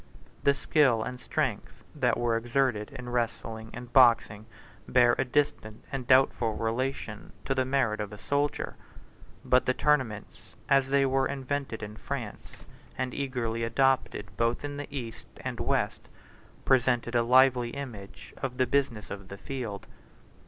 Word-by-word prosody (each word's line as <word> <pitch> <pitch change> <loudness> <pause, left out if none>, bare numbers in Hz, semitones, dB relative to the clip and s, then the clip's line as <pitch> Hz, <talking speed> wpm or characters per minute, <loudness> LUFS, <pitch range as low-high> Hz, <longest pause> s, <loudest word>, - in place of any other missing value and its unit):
The 140 - +4
skill 135 -7 +3
and 125 +2 -6
strength 130 -6 -3
that 125 -6 +1
were 120 -1 +1
exerted 120 -2 0
in 125 -1 -8
wrestling 115 -2 -3
and 125 0 -9
boxing 115 -4 +5 0.4
bear 120 -1 +5
a - - +4
distant 125 -5 -1
and 130 -3 -4
doubtful 125 -4 +4
relation 115 -1 -3
to 135 - +1
the 130 -1 +1
merit 130 -5 +1
of 105 -1 -5
a 105 - -8
soldier; 145 +6 -1 0.7
but 125 0 +3
the 130 - +2
tournaments, 130 -8 -1
as 135 -1 +4
they 140 0 +3
were 135 0 +2
invented 135 -4 -3
in 105 +1 -7
France, 120 -6 -7 0.3
and 125 -1 -2
eagerly 120 -4 -2
adopted 115 -5 +1
both 115 +5 0
in 145 0 -5
the 145 - -5
East 120 -5 -7
and - - -5
West, - - -1 0.6
presented 125 -2 +2
a 120 - +4
lively 125 0 +4
image 120 -7 -8
of 125 -2 -3
the 130 - +3
business 120 -5 -1
of 100 -1 -7
the 100 - -8
field. 115 -4 -5
125 Hz, 150 wpm, -28 LUFS, 115-135 Hz, 0.7 s, boxing